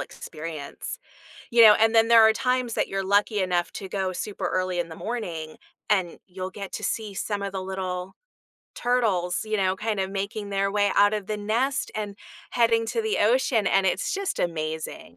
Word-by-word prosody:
experience. 155 - -7 0.5
You 235 0 +7
know, 215 -1 +10
and 225 +1 +4
then 225 0 +5
there 230 -1 +7
are 220 - +4
times 250 0 0
that - - 0
you're 195 0 -2
lucky 205 +2 +2
enough 180 -2 0
to 195 - -6
go 190 -1 -2
super 205 +3 -4
early 185 -1 -1
in 170 -1 -2
the 160 - -8
morning, 170 -10 -5 0.3
and 185 -5 +1
you'll 185 0 -6
get 195 0 -8
to - - -5
see 215 -3 -2
some 205 +1 -3
of 200 - -3
the 190 -1 -4
little 185 -1 -4 0.6
turtles, 215 -8 +1
you 215 0 -1
know, 190 -2 +1
kind 215 +1 -2
of 190 0 -2
making 200 +1 -4
their 195 0 0
way 205 0 +2
out 205 +1 +5
of 210 -3 -3
the 215 - -2
nest 230 +7 -1
and 210 -2 -4 0.3
heading 230 -1 +2
to 455 - -1
the 440 -1 0
ocean, 225 -1 +2
and 195 -1 +3
it's 190 +2 0
just 395 -1 -2
amazing. 155 - -4
200 Hz, 195 wpm, -25 LUFS, 185-225 Hz, 0.6 s, know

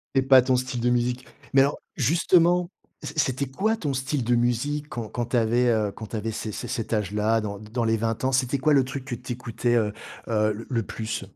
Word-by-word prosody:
C'est 135 - +4
pas 130 -1 +7
ton 130 0 +2
style 125 -1 -2
de 125 - +2
musique. 125 +1 0 0.3
Mais 135 - +7
alors 140 +2 +2 0.2
justement, 170 - +3 0.3
c 150 0 -5
c'était 140 -3 0
quoi 215 - 0
ton 145 -9 -2
style 130 0 -1
de 120 - +1
musique 135 +5 0
quand 120 -2 -5
quand 120 +2 -3
tu 125 - 0
avais, 120 +2 +2
heu, 110 -3 +1
quand 110 - -9
tu 115 - -7
avais 110 +1 -2
c 110 0 -4
c - - -6
cet 115 -3 -3
âge-là? 105 +2 +1
Dans 100 -1 -5
d 105 - -12
dans 120 0 -1
les 115 0 +2
20 115 +2 -2
ans? 130 - +2
C'était 130 +1 +1
quoi 145 +3 +2
le 135 - +5
truc 130 0 -6
que 130 - -5
tu 125 +1 -6
écoutais, 120 0 -1
heu 105 -3 +1 0.3
heu, 110 -1 +2
le 115 +3 -8
le 115 -4 -1
plus? 110 +3 -4
120 Hz, 245 wpm, -25 LUFS, 115-135 Hz, 0.3 s, pas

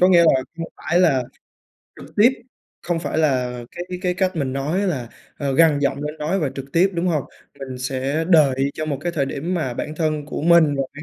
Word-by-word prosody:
có 180 - +6
nghĩa 175 -2 +6
là 135 -5 +4 0.2
không 165 -1 -4
phải 175 - 0
là 135 -8 +3 0.8
trực - - -14
tiếp, 235 +5 +6 0.5
không 175 -1 -1
phải 165 - -2
là 125 -5 +1
cái 175 - -6 0.2
cái 180 -2 0
cách 185 -1 0
mình 135 -4 -1
nói 145 +7 -1
là 135 - -2 0.5
gằn 160 -2 +5
giọng 140 0 -1
lên 150 +1 -5
nói 155 +6 -1
và 145 - 0
trực 135 - -5
tiếp, 180 +3 +4
đúng 170 +1 -1
hông? 155 -6 0 0.3
Mình 130 -2 -7
sẽ 135 +5 -2
đợi 140 -5 +4
cho 155 - -4
một 140 -3 -2
cái 170 +3 -2
thời 140 -4 0
điểm 155 +7 -3
mà 135 -8 -2
bản 150 - -4
thân 155 -3 -1
của 145 - -5
mình 165 -3 +5
và 135 - +1
cái 145 - -8
155 Hz, 225 wpm, -21 LUFS, 135-170 Hz, 0.8 s, có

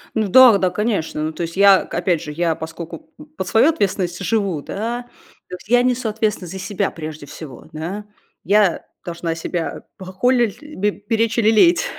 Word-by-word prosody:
Ну 220 -2 +1
да, 240 +1 +8
да, 185 -1 +1
конечно. 200 -7 -2
Ну 155 - -2
то 155 - -7
есть, 170 +2 -6
я 200 -1 +6
к - - -13
опять 170 -4 0
же, 150 - -7
я 165 +1 0
поскольку, 170 - -8
м, 300 - -11
под 185 - -3
свою 230 +7 +4
ответственность 190 - -1
живу, 195 -8 0
да, 235 +8 -4 0.5
то - - -5
есть 180 - -15
я 245 +1 +5
несу 250 -2 0
ответственность 210 -5 -2
за 190 - -6
себя 195 +1 -2
прежде 155 -2 -8
всего, 140 -2 -11
да? 175 +7 -5 0.4
Я 200 -2 +2 0.2
должна 170 -1 -3
себя 165 0 -4
похоли 235 +6 +1
л 300 -9 -11
пе 210 0 +3
беречь 225 +2 -1
и - - +4
лелеять. 285 - +4
195 Hz, 190 wpm, -20 LUFS, 170-225 Hz, 0.5 s, да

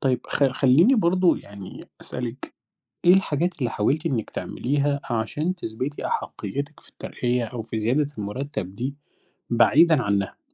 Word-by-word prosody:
طيب، 130 -2 +1
خ 140 - +1
خلّيني 140 - +5
برضه 185 -4 +3
يعني 100 -2 -10 0.2
أسألِك، 125 +1 -5 0.5
إيه 175 - +8
الحاجات 175 -2 0
اللي 125 -4 -1
حاولتِ 150 +10 0
إنّك 120 -8 -1
تعمليها 140 +2 -1
عشان 145 +10 -1
تثبتي 135 -2 -4
أحقيِّتِك 145 +2 -4
في - - -20
الترقية 125 -1 -2
أو 115 0 -5
في 110 0 -4
زيادة 130 +7 +1
المُرتَّب 105 -2 -4
دي 130 +6 -3 0.6
بعيدًا 150 +5 +5
عنّها؟ 100 -1 -1
130 Hz, 135 wpm, -24 LUFS, 115-150 Hz, 0.6 s, إيه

